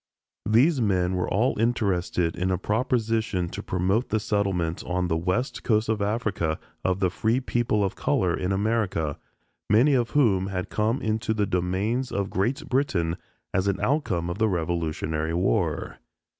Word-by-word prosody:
These 130 +6 +4
men 95 -4 +1
were 90 -1 -1
all 110 +3 +1
interested 95 -7 0
in 90 +2 -1
a 90 - +1
proposition 110 -3 0
to - - -6
promote 95 +6 0
the 110 - +1
settlement 95 -6 -1
on 90 0 -1
the 80 - +1
West 90 +10 -1
Coast 110 -2 +1
of 110 -2 0
Africa 100 -7 -1 0.3
of 95 +1 0
the 90 -2 +2
free 110 +6 +1
people 120 -5 0
of 95 - -1
color 85 +5 +1
in 90 +1 -2
America, 95 -7 0 0.5
many 120 +8 +5
of 120 -3 +2
whom 95 -9 +3
had 90 -2 -3
come 110 +5 0
into 110 0 0
the 105 -1 +1
domains 95 +8 -1
of 100 -1 -2
Great 125 +11 -1
Britain 95 -12 0 0.4
as 95 +1 +1
an 100 - 0
outcome 110 - 0
of 85 +4 -4
the 110 0 +3
Revolutionary 80 -2 -1
War. 90 -3 0
100 Hz, 160 wpm, -26 LUFS, 90-115 Hz, 0.5 s, many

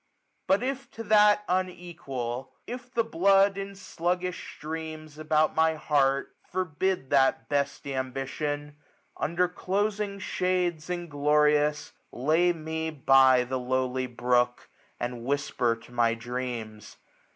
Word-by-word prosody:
But 195 +5 +3
if 270 0 -3
to 225 - -6
that 210 -1 +5
unequal; 170 -9 -3
if 245 +1 -7
the 235 -2 +1
blood, 195 -1 +4
^3^5 195 - -4
In 195 0 -7
sluggish 180 -1 -3
gtreams 155 -1 -6
about 155 0 +2
my 160 0 +3
heart, 140 -3 +1
forbid 185 -3 -2
That 135 -2 +3
best 140 -1 -1
ambition; 140 +2 -3 0.4
under 175 +3 +1
closing 200 +3 -2
shades^ 180 -4 -1
Inglorious, 150 -2 +1 0.2
lay 160 +7 +2
me 160 -1 -3
by 135 -3 +5
the 130 +1 -3
lowly 130 0 -1
brook^ 120 0 +1 0.4
And 120 -1 -4
whisper 130 -3 0
to 115 - -17
my 120 -1 +2
dreams. 115 -3 -6
155 Hz, 120 wpm, -27 LUFS, 130-180 Hz, 0.4 s, that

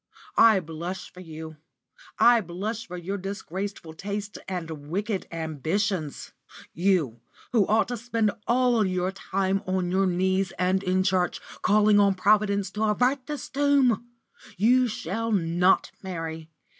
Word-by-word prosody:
I 220 -4 +7
blush 170 +3 -6
for 180 - -13
you; 160 -2 -9 0.6
I 240 -1 +6
blush 205 +6 -5
for 180 -1 -7
your 195 +3 -4
disgraceful 195 -2 -5
tastes 200 +4 -5
and 165 -5 -5
wicked 200 +3 -2
ambitions. 160 - -2 0.4
You, 165 - +1 0.3
who 220 -5 +3
ought 220 +2 +2
to 245 - -2
spend 230 -2 0 0.2
all 245 -2 +3
your 185 -1 0
time 195 0 -1
on 185 -1 0
your 190 +1 +2
knees 185 +1 0
and 185 +1 +1
in 185 -1 +1
church, 185 -2 +1 0.2
calling 210 0 +4
on 200 -1 +4
Providence 200 +1 +2
to 215 +1 -1
avert 250 +5 +1
this 295 -3 -5
doom! 270 -5 +2 0.5
You 250 +6 +4
shall 225 +2 -3
not 180 -1 +2
marry. 165 -4 -6
195 Hz, 135 wpm, -26 LUFS, 180-215 Hz, 0.6 s, I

